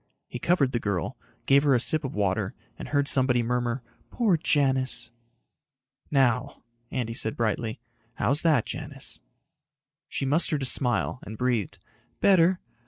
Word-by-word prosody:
He 125 - -6
covered 150 -6 +2
the 120 - 0
girl, 100 -6 -2 0.3
gave 140 +1 +5
her 140 -2 +3
a - - +3
sip 155 +6 -1
of 135 - -5
water 100 -3 0 0.2
and - - -8
heard 145 -1 +1
somebody 125 -3 +3
murmur, 120 +1 -1 0.3
"Poor 220 -7 +2
Janis." 130 -6 +1 1.0
"Now," 125 -4 +1 0.3
Andy 115 -3 -3
said 110 -1 -2
brightly, 110 0 -1 0.4
"how's 140 +4 +2
that, 155 -8 +3
Janis?" - - -6 0.9
She - - -2
mustered 150 0 +1
a - - 0
smile, 125 -1 0
and 110 +1 -8
breathed, 120 -7 -1 0.4
"Better. 185 -1 +4
130 Hz, 140 wpm, -26 LUFS, 115-145 Hz, 1.0 s, gave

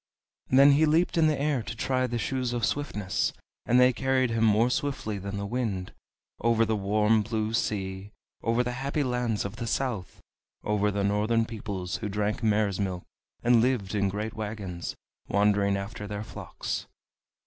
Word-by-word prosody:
Then 140 +2 +7
he 155 +3 +4
leaped 165 +4 +2
in 165 -2 +4
the 155 -2 +1
air 145 -3 +1
to 115 - -6
try 130 +2 0
the 120 -1 -2
Shoes 125 0 -1
of 120 -3 +1
Swiftness, 105 -10 -1 0.3
and 125 +2 +5
they 125 0 +6
carried 130 -1 +1
him 115 0 +1
more 110 +3 +4
swiftly 125 -7 -2
than 100 +1 -5
the 100 - -3
wind, 100 -5 -2 0.5
over 115 0 +3
the 110 0 0
warm 105 +2 +2
blue 110 0 -2
sea, 95 -3 -2 0.3
over 115 +2 +2
the 125 - -2
happy 140 +4 -1
lands 125 -5 -1
of 100 +2 -6
the 115 - -4
south, 115 -9 -2 0.4
over 105 0 +1
the 100 0 -1
northern 105 +3 +2
peoples 100 -5 -4
who 105 - -4
drank 105 +2 -1
mare's 105 -3 +1
milk 95 -3 -2 0.4
and 120 -1 +5
lived 115 -6 0
in 100 -2 +1
great 105 +3 -3
wagons, 105 -5 -5 0.3
wandering 100 -1 +2
after 105 +1 -6
their 105 0 -4
flocks. - - -5
110 Hz, 170 wpm, -28 LUFS, 100-125 Hz, 0.5 s, Then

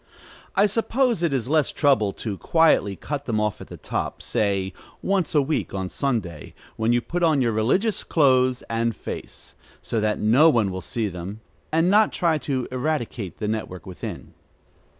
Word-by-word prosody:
I 200 - +5
suppose 230 +1 +1
it 170 -3 +1
is 130 -4 -1
less 155 0 +2
trouble 130 -9 +2
to 105 -3 -4
quietly 155 - +3
cut 145 +7 -5
them 110 -3 0
off 105 -1 -1
at - - -9
the - - -10
top - - -4
say 95 -3 0 0.3
once 190 -5 0
a 145 - +5
week, 150 -7 -2
on 95 -1 -3
Sunday, 105 - -3 0.2
when 110 +1 +1
you 120 0 +3
put 170 +10 -3
on 160 -4 +3
your 120 -3 +2
religious 155 - +1
clothes 130 -4 +3
and 115 0 -1
face, - - -8 0.3
so 115 - -1
that 105 0 +1
no 125 +10 +5
one 115 -9 +2
will 95 0 -5
see 115 +1 -2
them, 95 +3 -7 0.3
and 165 +2 +3
not 210 +1 +5
try 165 -4 +1
to 130 -4 -2
eradicate 125 - -3
the 105 - -3
network 105 -4 -4
within. 95 -2 -7
125 Hz, 175 wpm, -24 LUFS, 105-155 Hz, 0.3 s, I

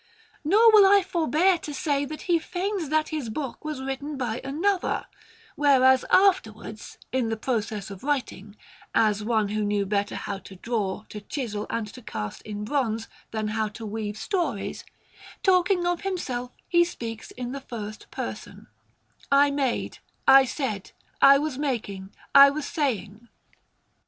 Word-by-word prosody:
Nor 430 +9 +6
will 425 -2 +8
I 400 0 +6
forbear 345 0 +2
to 295 -3 -6
say 285 0 0
that 305 +2 -7
he 345 -2 +2
feigns 370 -1 -3
that 310 0 +1
his 300 -7 -3
book 265 +3 -5
was 300 -4 -4
written 270 +2 -4
by 245 -3 -2
another, 350 +8 0 0.5
whereas 260 -3 +5
afterwards, 220 - +1
in 250 -3 0
the 225 - -2
process 215 -4 -2
of 195 - -9
writing 250 -8 -3 0.4
as 215 -1 +3
one 215 -2 +1
who 215 +1 -1
knew 205 -1 0
better 200 +1 -1
how 200 -1 -4
to 190 0 -13
draw, 210 -1 -2
to 210 - -7
chisel, 215 -3 -4
and 230 -2 -2
to 250 - -11
cast 105 - -6
in 210 -1 -6
bronze, 230 -4 -1 0.2
than 215 -1 -2
how 220 0 0
to 210 +2 -9
weave 210 0 -4
stories 360 - -2 0.6
talking 365 -1 +3
of 350 -1 0
himself, 260 -11 -3 0.2
he 345 -1 +4
speaks 230 -10 -6
in 245 0 -6
the 275 +1 -5
first 215 -5 -8
person, - - -7 0.7
"I 280 +1 +5
made," 275 -4 -1 0.3
"I 270 0 +8
said," 235 -8 -4 0.3
"I 275 0 +8
was 285 -2 -3
making," 210 -9 -3 0.2
"I 280 0 +10
was 285 +1 -3
saying." 235 - -2
260 Hz, 155 wpm, -26 LUFS, 215-305 Hz, 0.7 s, I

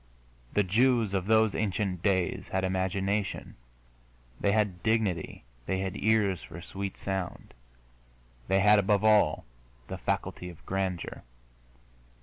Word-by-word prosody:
The 105 - +4
Jews 115 +2 +2
of 95 -1 -1
those 110 -1 +4
ancient 95 -3 -1
days 95 -3 0
had 95 0 -1
imagination, 95 +2 -1 0.8
they 100 - +2
had 100 -4 +1
dignity, 105 - 0 0.2
they 95 - 0
had 95 0 -3
ears 105 -5 +2
for 85 +1 -10
sweet 95 +3 -6
sound, 95 -2 -4 0.9
they 95 0 +3
had, 105 +1 +6
above 100 +1 +2
all, 110 -1 +4 0.4
the - - -5
faculty 90 - -2
of 85 - -14
grandeur. 95 -2 -3
95 Hz, 125 wpm, -29 LUFS, 95-105 Hz, 0.9 s, had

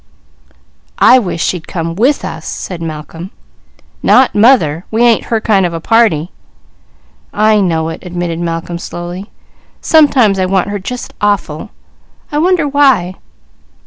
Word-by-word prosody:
"I 255 - +6
wish 180 -7 -3
she'd 175 -3 -3
come 165 -1 -4
with 250 - +1
us!" 160 0 -7
said 180 -3 -6
Malcolm. 160 +2 -7 0.7
"Not 255 +1 +4
mother! 205 - +3
We 225 +2 +1
ain't 235 -2 +3
her 225 - -1
kind 210 -3 +2
of 175 -2 -2
a - - -3
party." 175 -5 +1 1.0
"I 215 0 +2
know 165 -4 0
it," 165 - -8
admitted 175 -2 -4
Malcolm 170 0 -4
slowly. 175 +4 -7 0.5
"Sometimes 265 -11 +3
I 185 - +1
want 190 0 0
her 205 0 -3
just 245 +6 -7
awful. 205 -3 -1 0.6
I 295 - -1
wonder 345 -2 +2
why?" 265 -11 +2
190 Hz, 140 wpm, -13 LUFS, 170-230 Hz, 1.0 s, I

